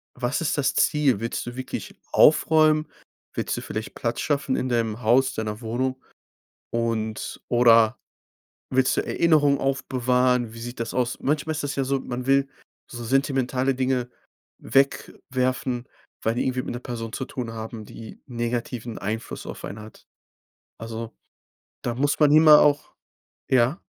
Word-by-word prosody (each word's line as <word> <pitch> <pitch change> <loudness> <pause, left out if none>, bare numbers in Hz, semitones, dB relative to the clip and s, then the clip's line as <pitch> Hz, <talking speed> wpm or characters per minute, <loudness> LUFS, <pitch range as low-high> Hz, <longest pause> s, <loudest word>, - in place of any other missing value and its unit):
was 125 +6 -1
ist 155 - 0
das 140 0 +1
Ziel? 140 -8 +3
Willst 115 +1 -3
du 120 0 -7
wirklich 130 0 -6 0.2
aufräumen? 155 0 +5 0.5
Willst - - -1
du - - -4
vielleicht - - -6
Platz - - -2
schaffen 140 -3 0
in 130 - -1
deinem 115 -1 -1
Haus, 130 +4 +3
deiner 110 +1 -4
Wohnung 130 +3 -2 0.7
und 115 -2 -2
oder 115 -1 +5 0.7
willst 130 0 +2
du - - 0
Erinnerungen 150 -4 +3
aufbewahren? 125 -2 +1
Wie 115 - -9
sieht 120 0 -7
das 115 - -3
aus? 125 -1 -1
Manchmal 150 +2 0
ist 150 - -3
das 145 0 -3
ja 135 - +1
so, 135 0 0
man 125 +1 -5
will 135 0 +3 0.4
so 120 -1 -7
sentimentale 135 0 +1
Dinge 130 -1 -1 0.5
wegwerfen, 130 -2 0 0.3
weil 110 +1 +1
die - - 0
irgendwie 130 -1 -1
mit - - -5
'ner 120 - -5
Person 115 -3 -6
zu 130 - -3
tun 120 -3 -5
haben, 110 -1 -7
die 110 -1 -11
negativen 120 -1 -4
Einfluss 110 +3 -5
auf - - -8
einen 105 +2 -6
hat. 110 +1 -14 0.7
Also, 115 0 -6 0.7
da 120 - -2
muss 140 +3 0
man 150 -1 +5
immer 155 -1 +8
auch 145 -1 +2 0.6
ja? 130 +4 +3
125 Hz, 155 wpm, -24 LUFS, 115-135 Hz, 0.7 s, immer